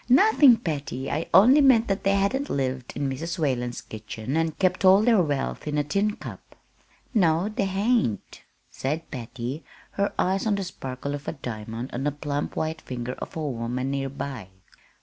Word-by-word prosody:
"Nothing, 280 Hz, -, +7 dB
Patty. 140 Hz, -, -4 dB
I 160 Hz, -, -2 dB
only 245 Hz, -, +7 dB
meant 255 Hz, -5 st, +5 dB
that 195 Hz, -1 st, -1 dB
they 195 Hz, 0 st, +3 dB
hadn't 250 Hz, +9 st, 0 dB
lived 130 Hz, -2 st, -2 dB
in 140 Hz, -, -1 dB
Mrs. 165 Hz, +7 st, -4 dB
Whalen's 125 Hz, -6 st, -1 dB
kitchen 110 Hz, +3 st, -6 dB
and 165 Hz, -1 st, 0 dB
kept 185 Hz, 0 st, +1 dB
all 190 Hz, +2 st, +7 dB
their 225 Hz, -4 st, +5 dB
wealth 145 Hz, -2 st, -2 dB
in 150 Hz, 0 st, -1 dB
a 145 Hz, -, +2 dB
tin 200 Hz, +8 st, 0 dB
cup." -, -, -10 dB, 0.6 s
"No, 175 Hz, -2 st, +3 dB
they 210 Hz, -2 st, -1 dB
hain't," 195 Hz, -, 0 dB, 0.3 s
said 155 Hz, +5 st, -3 dB
Patty, 125 Hz, +4 st, -5 dB, 0.3 s
her 200 Hz, 0 st, 0 dB
eyes 190 Hz, +4 st, +1 dB
on 210 Hz, -, +2 dB
the 200 Hz, -, -2 dB
sparkle 140 Hz, -5 st, -5 dB
of 145 Hz, +1 st, -6 dB
a -, -, -2 dB
diamond 115 Hz, -2 st, -6 dB
on 125 Hz, -, -3 dB
the 150 Hz, -, +2 dB
plump 145 Hz, 0 st, -3 dB
white 160 Hz, 0 st, -2 dB
finger 125 Hz, -1 st, -5 dB
of -, -, -7 dB
a 155 Hz, -2 st, -2 dB
woman 125 Hz, +1 st, -2 dB
near 135 Hz, -1 st, -2 dB
by. 135 Hz, -7 st, -6 dB
150 Hz, 180 wpm, -25 LUFS, 130-195 Hz, 0.6 s, Nothing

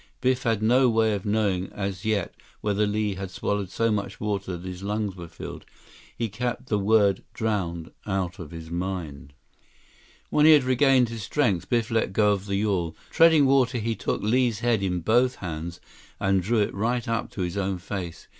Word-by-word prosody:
Biff 130 Hz, 0 st, +1 dB
had 115 Hz, -3 st, 0 dB
no 125 Hz, +3 st, +5 dB
way 110 Hz, -1 st, +2 dB
of 100 Hz, 0 st, -4 dB
knowing 100 Hz, -3 st, 0 dB
as 100 Hz, -2 st, -4 dB
yet 105 Hz, -4 st, 0 dB, 0.3 s
whether 105 Hz, 0 st, +1 dB
Li 105 Hz, 0 st, 0 dB
had 95 Hz, 0 st, -6 dB
swallowed 100 Hz, +1 st, -2 dB
so 115 Hz, +3 st, 0 dB
much 100 Hz, -2 st, -3 dB
water 100 Hz, -3 st, -2 dB
that 90 Hz, +2 st, -9 dB
his 90 Hz, 0 st, -7 dB
lungs 105 Hz, -1 st, -2 dB
were 85 Hz, -2 st, -8 dB
filled. -, -, -9 dB, 0.5 s
He 115 Hz, -, -1 dB
kept 120 Hz, +4 st, -4 dB
the 105 Hz, -, +1 dB
word 100 Hz, -1 st, +3 dB
"drowned" 90 Hz, -7 st, -2 dB, 0.2 s
out 95 Hz, -2 st, -2 dB
of 85 Hz, -4 st, -7 dB
his 80 Hz, 0 st, -9 dB
mind. 85 Hz, -6 st, -4 dB, 1.0 s
When 150 Hz, +1 st, +5 dB
he 160 Hz, -, +9 dB
had 145 Hz, -3 st, +5 dB
regained 130 Hz, -1 st, +4 dB
his 115 Hz, -1 st, -6 dB
strength, 100 Hz, -, 0 dB
Biff 120 Hz, -1 st, +1 dB
let 110 Hz, -4 st, 0 dB
go 105 Hz, 0 st, +4 dB
of 100 Hz, 0 st, -2 dB
the 100 Hz, -, -1 dB
yawl. 95 Hz, -5 st, 0 dB, 0.2 s
Treading 160 Hz, -3 st, +6 dB
water, 130 Hz, -2 st, +3 dB
he 115 Hz, 0 st, -1 dB
took 95 Hz, -, -2 dB
Li's 115 Hz, 0 st, +1 dB
head 120 Hz, -4 st, +2 dB
in 90 Hz, -2 st, -1 dB
both 120 Hz, +7 st, +3 dB
hands 85 Hz, -1 st, -6 dB, 0.4 s
and 95 Hz, -1 st, +2 dB
drew 110 Hz, +4 st, +1 dB
it 105 Hz, -, 0 dB
right 120 Hz, +4 st, -1 dB
up 115 Hz, 0 st, -1 dB
to 95 Hz, -, -4 dB
his 90 Hz, 0 st, -2 dB
own 95 Hz, -1 st, -1 dB
face. 90 Hz, -2 st, -6 dB
105 Hz, 190 wpm, -25 LUFS, 95-115 Hz, 1.0 s, he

